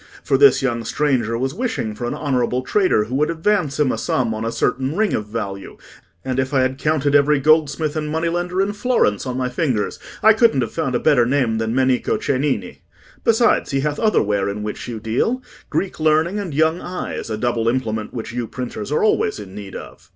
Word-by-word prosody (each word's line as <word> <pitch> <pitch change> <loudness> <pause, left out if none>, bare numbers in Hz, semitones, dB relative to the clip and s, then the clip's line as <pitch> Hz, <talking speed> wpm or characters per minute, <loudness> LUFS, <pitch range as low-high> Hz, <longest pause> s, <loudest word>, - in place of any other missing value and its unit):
For - - +1
this 420 - +5
young 120 -3 -1
stranger 120 -3 0
was 130 +2 -2
wishing 220 - -2
for 120 +3 -4
an - - -3
honourable 130 -3 0
trader 185 - +2
who 110 +4 -7
would 150 +2 +1
advance 165 -3 0
him 145 -4 +3
a - - -3
sum 120 -3 0
on 110 +1 -4
a 115 - -1
certain 130 +5 -1
ring 215 -1 +2
of 105 - -2
value, 100 -3 -5 0.5
and 130 0 -1
if 130 +1 -1
I 130 - +4
had 130 +1 -1
counted 150 -2 +1
every 145 0 +4
goldsmith 155 +1 +2
and 150 -1 -2
money 160 +2 -1
lender 175 +2 0
in 205 +1 -2
Florence 205 - +1
on 125 0 -3
my 130 -1 0
fingers, 125 -5 -1 0.2
I 220 +1 +8
couldn't 220 - +3
have 115 - -2
found 145 -6 -1
a - - +2
better 125 -6 +3
name 125 -4 +1
than 110 +1 -1
Menico 130 -1 +1
Cennini. 140 0 -2 0.4
Besides, 230 +1 +3
he 135 -1 0
hath 150 0 -2
other 215 -2 +3
ware 100 -1 0
in 105 +1 -4
which 105 - -5
you 115 -2 -5
deal—Greek 190 - -3
learning, 160 +5 +2
and 195 -5 -4
young 160 +4 +1
eyes—a 175 -10 -5
double 120 0 -1
implement 110 -4 -2
which 120 0 -6
you 120 -1 -3
printers 125 -2 -6
are 150 - +1
always 145 - +1
in 95 -2 -9
need 100 -2 -8
of." - - -10
135 Hz, 210 wpm, -20 LUFS, 115-160 Hz, 0.5 s, I